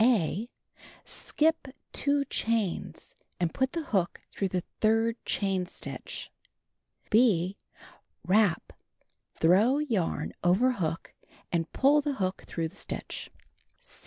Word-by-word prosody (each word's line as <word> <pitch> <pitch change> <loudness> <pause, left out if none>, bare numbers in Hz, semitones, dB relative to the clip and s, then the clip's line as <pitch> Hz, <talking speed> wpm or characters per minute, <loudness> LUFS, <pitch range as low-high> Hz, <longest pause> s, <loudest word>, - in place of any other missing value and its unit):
(a) 225 -1 +2 0.6
Skip 320 -1 0 0.3
2 285 0 +2
chains, 225 -7 -1 0.3
and 175 -2 0
put 265 0 0
the 335 -1 -2
hook 180 -4 +1
through 195 - -1
the 180 -1 -2 0.2
third 225 +1 +3
chain 190 -3 0
stitch. - - -6 0.8
(6) 200 -6 +4 0.7
Wrap 200 -2 +3 0.6
(throw 200 - +4
yarn 235 - -1
over 190 +9 +4
hook) 165 -8 -3 0.4
and 165 -1 0
pull 290 +2 +4
the 290 0 -1
hook 185 -6 -2
through 165 -1 -2
the 180 - -18
stitch. - - -5
210 Hz, 110 wpm, -29 LUFS, 180-255 Hz, 0.8 s, 6